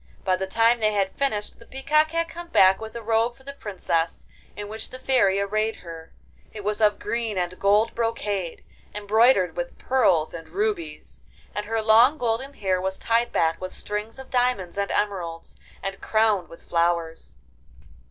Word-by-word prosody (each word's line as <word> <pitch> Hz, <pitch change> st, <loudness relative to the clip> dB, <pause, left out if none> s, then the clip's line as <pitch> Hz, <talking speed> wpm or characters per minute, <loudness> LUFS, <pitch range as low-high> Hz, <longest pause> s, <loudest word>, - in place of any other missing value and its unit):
By 185 Hz, -1 st, +2 dB
the 190 Hz, +1 st, -3 dB
time 230 Hz, +4 st, +3 dB
they 215 Hz, -1 st, +2 dB
had 195 Hz, -2 st, +1 dB
finished 215 Hz, -7 st, -2 dB
the 230 Hz, -, -16 dB
peacock 305 Hz, +4 st, +1 dB
had 335 Hz, +1 st, -1 dB
come 345 Hz, +1 st, -9 dB
back 190 Hz, -, +5 dB
with 220 Hz, +1 st, -8 dB
a 235 Hz, -, -6 dB
robe 225 Hz, +2 st, +1 dB
for 265 Hz, -, -20 dB
the 280 Hz, +1 st, -8 dB
Princess, 180 Hz, -9 st, -2 dB, 0.3 s
in 205 Hz, 0 st, -6 dB
which 220 Hz, +1 st, -5 dB
the 255 Hz, -, -8 dB
Fairy 245 Hz, -7 st, +2 dB
arrayed 215 Hz, +2 st, 0 dB
her. 165 Hz, -1 st, -9 dB, 0.4 s
It 210 Hz, -, -8 dB
was 210 Hz, +2 st, -1 dB
of 210 Hz, -1 st, +4 dB
green 230 Hz, -3 st, -2 dB
and 180 Hz, 0 st, -2 dB
gold 210 Hz, +3 st, +3 dB
brocade, 205 Hz, -6 st, -2 dB, 0.3 s
embroidered 210 Hz, -3 st, +3 dB
with 175 Hz, 0 st, -5 dB
pearls 190 Hz, -12 st, +2 dB
and 165 Hz, -1 st, -8 dB
rubies, 160 Hz, -, -3 dB, 0.3 s
and 210 Hz, +1 st, -4 dB
her 225 Hz, 0 st, -1 dB
long 230 Hz, +7 st, +6 dB
golden 250 Hz, +2 st, -2 dB
hair 190 Hz, -4 st, 0 dB
was 190 Hz, 0 st, -2 dB
tied 230 Hz, +1 st, +1 dB
back 165 Hz, +1 st, +1 dB
with 185 Hz, -, -6 dB
strings 210 Hz, +3 st, -5 dB
of 265 Hz, 0 st, -11 dB
diamonds 245 Hz, -8 st, 0 dB
and 200 Hz, 0 st, -1 dB
emeralds, 180 Hz, -5 st, -2 dB, 0.3 s
and 195 Hz, 0 st, -4 dB
crowned 215 Hz, -6 st, +2 dB
with 165 Hz, -, -13 dB
flowers. 170 Hz, -, -1 dB
210 Hz, 175 wpm, -24 LUFS, 185-230 Hz, 0.4 s, long